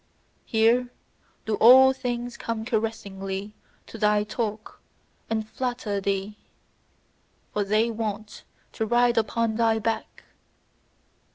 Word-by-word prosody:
Here 235 +2 +3 0.6
do 220 - -1
all 260 +3 +8
things 245 -2 -4
come 225 -1 -4
caressingly 205 -3 -3 0.3
to 225 - -11
thy 210 -1 +3
talk 215 0 -5 0.5
and 220 -1 -2
flatter 240 -5 -3
thee: 200 +1 -2 1.2
for 210 - 0
they 215 +3 +1
want 215 -1 -5 0.3
to 220 - -3
ride 240 0 +3
upon 225 0 -1
thy 225 -1 +3
back. 225 +1 -3
220 Hz, 105 wpm, -25 LUFS, 210-235 Hz, 1.2 s, all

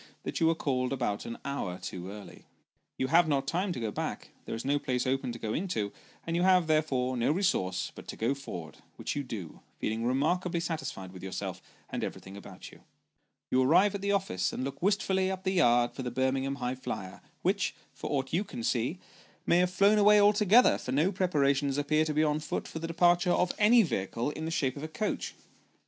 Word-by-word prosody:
that - - -3
you 165 - +4
were 165 - +3
called 130 -5 -1
about 120 -6 -2
an 115 - -5
hour 140 -10 -3
too 90 0 -6
early. 105 0 -11 0.5
You - - 0
have 170 +1 +5
not 140 -3 +1
time 185 +3 -1
to 170 - -4
go 110 -2 -2
back; - - -4
there - - -4
is 115 - -6
no 145 +1 +2
place 125 -3 -1
open 130 -1 0
to 120 - -6
go 110 -2 -3
into, 155 - -2 0.3
and 165 - -2
you 175 - +1
have, 185 -1 +5
therefore, 145 -5 +1
no 120 +3 +2
resource 175 - 0
but - - -12
to - - -6
go 115 +5 0
forward, 85 - -8 0.2
which - - -4
you 145 - -1
do, 105 - -7 0.2
feeling 110 +1 -2
remarkably 165 +8 +1
satisfied 160 - -4
with 95 - -10
yourself, 95 -1 -5 0.3
and - - -3
everything 95 +1 -6
about 100 - -10
you. - - -16 0.7
You 130 - +4
arrive 175 +10 +4
at 200 - -4
the 200 0 0
office, 190 - 0
and - - -4
look 135 +1 -5
wistfully 190 -1 +2
up 190 0 -4
the 190 - +1
yard 120 -9 +4
for - - -6
the 125 - -3
Birmingham 130 +1 0
High 125 -2 -2
flier, 95 -7 -6 0.2
which, - - +1 0.2
for - - -6
aught 135 -1 -2
you 180 +5 +2
can 120 - -7
see, 125 +9 0 0.5
may 175 - +4
have 180 0 +3
flown 200 +3 +4
away 210 0 +7
altogether, 210 +3 +5
for 125 - -5
no 155 +8 +2
preparations 140 -7 +1
appear 155 +2 +2
to 155 - -1
be 155 - +4
on 150 0 +1
foot 155 - -4
for 160 - -6
the 165 - -4
departure 175 +2 +3
of 180 0 +2
any 225 +2 +6
vehicle 115 - -2
in 160 +1 -5
the - - -2
shape 135 -6 0
of 140 - -7
a - - -3
coach. 160 +7 -3
145 Hz, 215 wpm, -30 LUFS, 125-180 Hz, 0.7 s, away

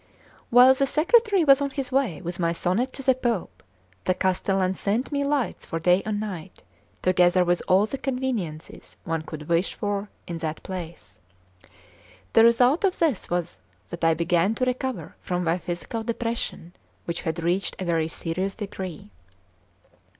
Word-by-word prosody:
While 250 +2 +8
the 275 +1 0
secretary 390 - +3
was 275 -2 +6
on 280 - 0
his 270 -2 -4
way 255 - 0
with 175 +2 -5
my 170 -1 +1
sonnet 200 +10 0
to 270 - -6
the 260 0 +5
Pope, 240 -7 -3 0.4
the 185 - +2
castellan 190 0 +1
sent 215 +8 -1
me 285 -1 0
lights 280 -3 -1
for 165 - -3
day 180 +3 +3
and 210 -1 -1
night, 190 -4 -7 0.4
together 180 0 +4
with 175 0 +1
all 190 +3 +5
the 270 +5 -5
conveniences 245 - -4
one 165 -1 -2
could 155 -1 -8
wish 170 +2 +1
for 205 0 -3 0.2
in 170 -1 -5
that 160 -1 -4
place. 175 -3 -8 1.1
The 225 - +7
result 245 - +4
of 380 -2 +2
this 310 - 0
was 175 - -2 0.3
that - - -7
I 165 0 +4
began 170 +5 +1
to 255 - 0
recover 250 - -3
from 180 0 -2
my 170 +1 +1
physical 180 +6 -4
depression, 230 -6 -3 0.3
which 170 - -3
had 165 +1 -3
reached 180 +3 0
a 185 - -3
very 165 -2 +1
serious 180 +4 -3
degree. 190 - -7
190 Hz, 165 wpm, -25 LUFS, 170-255 Hz, 1.1 s, While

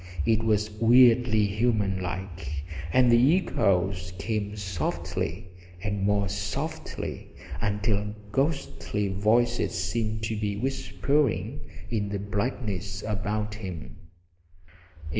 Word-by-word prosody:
It 110 -1 +3
was 105 -1 +1
weirdly 120 -2 +6
human 105 -2 +1
like; 90 -5 -4 0.3
and 125 +2 +5
the 130 +9 +6
echoes 95 - +1
came 105 0 -2
softly, 90 -1 -3 0.3
and 100 -1 -1
more 100 0 +2
softly, 100 - -4 0.3
until 105 0 0 0.2
ghostly 105 - -1
voices 115 +5 +2
seemed 110 +5 -1
to 110 +1 -1
be 105 -1 -2
whispering 135 -1 0 0.3
in 105 -3 0
the 100 - -2
blackness 100 -1 -3
about 105 0 -2
him. 95 -7 -7
105 Hz, 100 wpm, -27 LUFS, 100-115 Hz, 0.3 s, weirdly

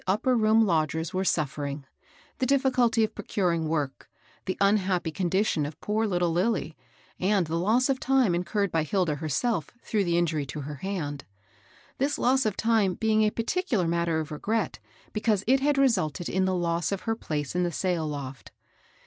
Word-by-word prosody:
271 190 - +4
upper 255 +3 +1
room 220 0 +4
lodgers 160 -2 0
were 185 +1 0
suffering, 145 -4 -2 0.5
the 260 - +1
difficulty 255 -4 +3
of 215 - -1
procuring 170 -5 -1
work, 150 -4 -3 0.4
the 185 - -2
unhappy 195 -4 +2
condition 185 -1 0
of 145 +1 -6
poor 220 +2 0
little 175 -3 +1
Lilly, 175 -2 0 0.4
and 190 -1 +2
the 160 +1 -3
loss 220 +9 +2
of 270 -2 0
time 265 -8 +2
incurred 180 +3 -1
by 165 - +1
Hilda 170 0 0
herself 160 - -1
through 210 -3 0
the 170 -2 +1
injury 155 -4 0
to 150 +2 -5
her 145 +1 -6
hand, 150 -6 -4 0.4
— - - -29
this 280 +2 +1
loss 260 0 +2
of 210 - -2
time 220 -5 +2
bdng 220 -1 +2
a 215 - +4
particular 230 - -1
mat 170 0 0
ter 160 -1 +1
of 155 0 -5
regret 215 +9 -2 0.3
because 215 -2 +1
it 265 +3 +4
had 285 +1 +1
resulted 185 - +1
in 190 +1 +1
the 190 0 +1
loss 170 -1 0
of 200 - -2
her 225 -1 -1
place 150 - -4
in 180 - +2
the 175 -1 0
sail 170 -2 -1
loft. 135 -3 -6
185 Hz, 185 wpm, -27 LUFS, 160-220 Hz, 0.5 s, 271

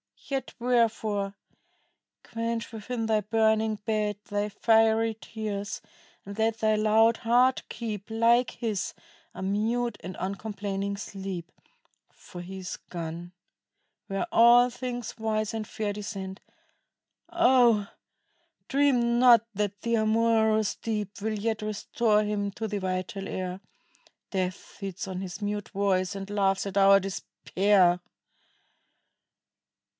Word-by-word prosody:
Yet 270 -2 -3
wherefore? 220 -4 +1 0.9
Quench 230 -1 -3
within 225 +1 -4
thy 220 -1 +2
burning 220 +1 +2
bed 210 -2 0
Thy 205 0 0
fiery 225 +1 +3
tears, 210 -3 -5 0.4
and 200 +1 -8
let 225 0 +1
thy 215 -1 +3
loud 220 +2 +4
heart 245 +3 +3
keep, 215 -3 -5
Like 230 +2 +3
his, 220 -5 -3 0.4
a - - -6
mute 220 +3 0
and 185 +1 -7
uncomplaining 200 0 -3
sleep; 190 -3 -6 0.6
For 175 - -10
he 190 +2 -8
is 185 0 -5
gone, 170 +1 -6 0.7
where 195 -1 -2
all 240 +2 +7
things 245 -1 -5
wise 215 -1 -1
and 220 -1 -4
fair 215 -3 -3
Descend: 195 -2 -6 0.9
oh, 245 -10 +4 0.8
dream 250 -4 +3
not 240 -3 +7
that 205 0 -2
the 235 0 +1
amorous 220 -1 +2
Deep 210 -3 -4
Will 215 +1 -1
yet 220 +1 -1
restore 215 +1 +1
him 205 -1 -1
to 220 +3 -4
the 205 -1 -3
vital 185 +1 -3
air; 185 0 -4 0.7
Death 185 -2 -1
feeds 195 -2 -7
on 185 -1 -4
his 185 +1 -6
mute 205 0 -3
voice 195 -2 0
and 195 0 -6
laughs 195 -1 +1
at 200 0 -4
our 195 0 +7
despair. 190 -1 +1
210 Hz, 120 wpm, -27 LUFS, 195-225 Hz, 0.9 s, all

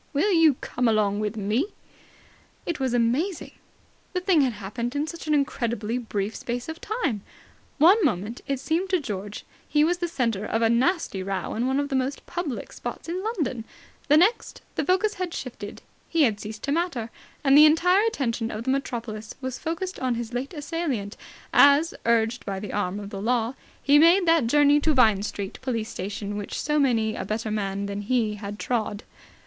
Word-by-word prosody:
"Will 320 +9 +2
you 325 -5 +5
come 245 -1 -1
along 210 -2 +2
with 215 +1 -2
me!" 210 +6 +1 1.0
It 340 -3 -3
was 260 -2 0
amazing. 270 +10 0 0.6
The 365 - 0
thing 360 -4 +3
had 260 -3 +1
happened 230 +5 -5
in 290 +1 0
such 325 0 -8
an 305 - +3
incredibly 235 -4 -1
brief 210 -3 -3
space 240 0 -4
of 320 +1 -7
time. 400 - -2 0.6
One 370 +8 +6
moment, 220 - -1
it 275 -2 -1
seemed 330 +7 -1
to 370 -2 +2
George, 205 -6 -6 0.2
he 300 0 +4
was 350 +3 +1
the 350 - -1
centre 230 - -1
of 225 +2 0
a 225 - +4
nasty 255 - +1
row 190 -1 -3
in 235 +3 -1
one 265 +1 +1
of 285 0 -1
the 270 - -1
most 265 +2 -2
public 340 -8 -4
spots - - -7
in 360 +3 -3
London; 305 - -2 0.4
the 295 - +6
next, 385 +9 +2
the - - -1
focus 385 +4 +2
had 365 -3 -4
shifted; 220 -5 -7 0.3
he 330 -2 +3
had 220 -6 +2
ceased 215 0 -8
to 280 - -1
matter; 285 -9 -1 0.3
and 275 -1 +5
the 300 +1 +10
entire 360 +6 +4
attention 235 - -1
of 215 0 -5
the 260 - 0
metropolis 230 -5 -4
was 260 -2 -5
focused 350 +4 -4
on 255 -2 0
his 235 0 -5
late 260 +6 -4
assailant, 290 - -3 0.4
as, 285 +4 +6
urged 235 +1 +2
by 195 -1 -4
the 205 -1 -6
arm 205 -1 -1
of 200 0 -8
the 195 - -5
Law, 235 +1 +1 0.3
he 285 +1 +6
made 345 +4 +6
that 330 -7 +4
journey 290 +3 +5
to 305 0 +1
Vine 220 -6 +5
Street 200 -1 -5
Police 230 -4 -2
Station 205 +1 -5
which 205 - -5
so 300 0 +1
many 225 -6 +2
a - - -4
better 215 +2 -3
man 200 -1 -2
than 200 0 -4
he 225 0 +1
had 205 0 -7
trod. 220 -4 -2
250 Hz, 195 wpm, -25 LUFS, 215-310 Hz, 1.0 s, the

